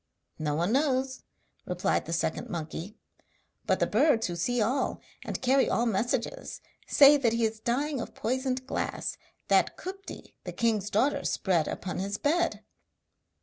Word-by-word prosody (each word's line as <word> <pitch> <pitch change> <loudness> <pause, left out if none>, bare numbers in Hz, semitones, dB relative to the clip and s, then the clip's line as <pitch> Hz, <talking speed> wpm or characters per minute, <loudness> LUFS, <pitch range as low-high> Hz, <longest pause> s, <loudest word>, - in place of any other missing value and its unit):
'No 150 -1 -1
man 175 +5 +1
knows,' 265 -1 +1 0.5
replied 180 0 0
the - - -4
second 165 -1 -1
monkey, 170 +5 -5 0.7
'but - - +2
the - - +3
birds, 230 -1 +3
who 175 - -3
see 245 +9 0
all 245 +6 0 0.2
and - - -5
carry 265 +1 +4
all 235 - +1
messages, 240 - -1 0.3
say 290 +1 +8
that 240 -5 +1
he 230 0 +2
is 220 0 -2
dying 265 +4 -1
of - - -8
poisoned 255 +2 -1
glass - - -3 0.3
that - - +3
Kupti 390 +2 -8
the - - -6
king's 215 -3 0
daughter 275 +7 +1
spread 175 -5 +1
upon 180 0 -4
his 200 +2 -2
bed.' 340 +4 0
235 Hz, 150 wpm, -28 LUFS, 195-270 Hz, 0.7 s, say